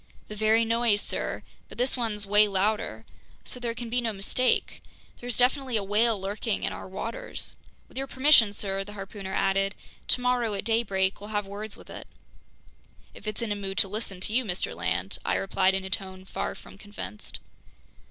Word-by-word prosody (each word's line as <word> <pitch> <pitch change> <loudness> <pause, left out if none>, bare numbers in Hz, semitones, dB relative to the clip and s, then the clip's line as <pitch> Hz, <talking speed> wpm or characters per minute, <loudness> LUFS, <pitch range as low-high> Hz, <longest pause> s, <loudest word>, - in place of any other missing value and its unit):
"The 210 - -6
very 220 +2 +4
noise, 230 -2 +3
sir, - - -3 0.3
but - - -11
this 250 +2 +2
one's 220 -4 0
way 210 +1 +6
louder. 195 - 0 0.4
So 250 - -3
there 235 -1 -2
can 240 0 -5
be 245 +2 +1
no 230 -2 0
mistake. 210 +6 +1 0.4
There's 245 0 -3
definitely 255 -1 +3
a 205 - 0
whale 210 +2 +2
lurking 205 +3 -2
in - - 0
our - - -7
waters. 225 +5 -3 0.3
With - - -6
your 270 - -2
permission, 260 -5 +6
sir," 195 -1 -2
the 205 +1 -10
harpooner 195 -1 -7
added, 195 +1 +1 0.3
"tomorrow 245 -3 +2
at 200 - -4
daybreak 200 -4 +1
we'll 205 - -8
have 205 -1 -1
words 205 +2 -5
with - - -13
it." - - -8 1.1
"If - - -11
it's 215 +2 -2
in 225 - -2
a - - +1
mood 195 -1 -5
to 200 - +7
listen 200 -2 -4
to 210 - -1
you, 255 +2 +3
Mr. 185 -5 -2
Land," - - -1
I - - +1
replied 190 0 +2
in 190 0 -2
a - - -5
tone 190 -1 -2
far - - -3
from - - -14
convinced. 205 - -8
210 Hz, 190 wpm, -28 LUFS, 195-230 Hz, 1.1 s, to